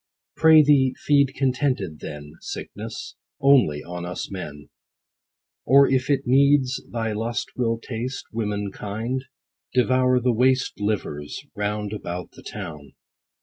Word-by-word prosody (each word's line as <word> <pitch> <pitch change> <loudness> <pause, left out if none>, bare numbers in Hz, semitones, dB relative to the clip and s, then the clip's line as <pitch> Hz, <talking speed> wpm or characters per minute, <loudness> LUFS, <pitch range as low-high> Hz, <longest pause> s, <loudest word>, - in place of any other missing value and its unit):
'Pray 160 -1 +7
thee, 140 -3 +4
feed 140 -2 +2
contented 130 - 0
then, 75 0 -8
Sickness, - - -7 0.2
only 125 - +4
on 90 0 -6
us 90 +2 -5
men; 75 -6 -8 0.9
Or 140 +2 +6
if 130 0 +1
it 140 -2 +3
needs 135 0 +3
thy 115 -2 -2
lust 115 +3 -3
will 115 -2 0
taste 125 +4 -5
Woman 105 -3 -2
kind; 115 +7 -4 0.5
devour 130 0 +3
the 125 0 +1
waste 130 +1 +2
Livers, 85 -9 -3
round 105 0 -2
about 90 -4 -5
the - - -15
town. 75 -9 -8
115 Hz, 125 wpm, -24 LUFS, 100-130 Hz, 0.9 s, Pray